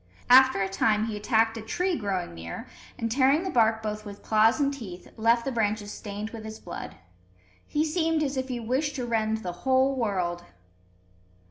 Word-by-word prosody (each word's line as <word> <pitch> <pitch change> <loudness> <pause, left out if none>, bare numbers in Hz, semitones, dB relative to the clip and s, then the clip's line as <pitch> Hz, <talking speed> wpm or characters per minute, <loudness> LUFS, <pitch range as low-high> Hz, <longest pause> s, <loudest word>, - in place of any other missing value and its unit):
After 260 -2 +7
a - - 0
time 210 +2 +1
he 225 -2 -4
attacked 225 +1 +1
a - - -5
tree 350 - -1
growing 195 - -3
near, 85 0 -7 0.3
and, 230 0 -2
tearing 270 +6 +3
the 375 - -3
bark 220 -2 +3
both 215 0 -3
with 205 -1 -10
claws 220 +4 +4
and 280 -1 +1
teeth, 190 -10 -9
left 230 +1 +2
the 270 - -1
branches 210 -3 -1
stained 210 +1 -6
with 225 -2 -8
his 220 0 -7
blood. 175 - -8 0.7
He 300 +1 0
seemed 320 -1 +1
as 280 -1 -2
if 260 0 -2
he 250 -2 -3
wished 265 +6 -1
to 250 -3 -3
rend 220 -1 0
the 180 - -3
whole 265 +1 +3
world! 185 -7 -1
225 Hz, 190 wpm, -27 LUFS, 210-265 Hz, 0.7 s, After